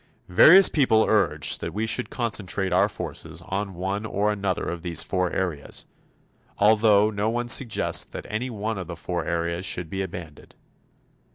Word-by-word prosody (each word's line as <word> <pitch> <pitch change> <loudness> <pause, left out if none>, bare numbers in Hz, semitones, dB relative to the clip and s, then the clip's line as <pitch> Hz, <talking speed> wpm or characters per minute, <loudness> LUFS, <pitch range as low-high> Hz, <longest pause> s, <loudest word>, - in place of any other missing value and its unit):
Various 175 - +8
people 120 -7 +3
urge 75 -9 +1
that - - -6
we 110 +2 -1
concentrate 105 -5 -1
our 90 - +3
forces - - -6
on 100 0 -4
one 95 +4 -3
or 105 -1 -1
another 100 -3 -2
of 85 -1 -5
these 85 -1 +1
four 90 -2 -1
areas, 85 -7 -3 0.7
although 105 0 +4
no 105 +1 -1
one 120 +1 -2
suggests 120 -2 +1
that - - -9
any 115 +4 -3
one 110 -2 -4
of 90 - -6
the 85 - -6
four 85 0 -4
areas 85 +1 -2
should 90 -3 -3
be 95 - -3
abandoned. 85 -5 -9
100 Hz, 160 wpm, -24 LUFS, 90-110 Hz, 0.7 s, Various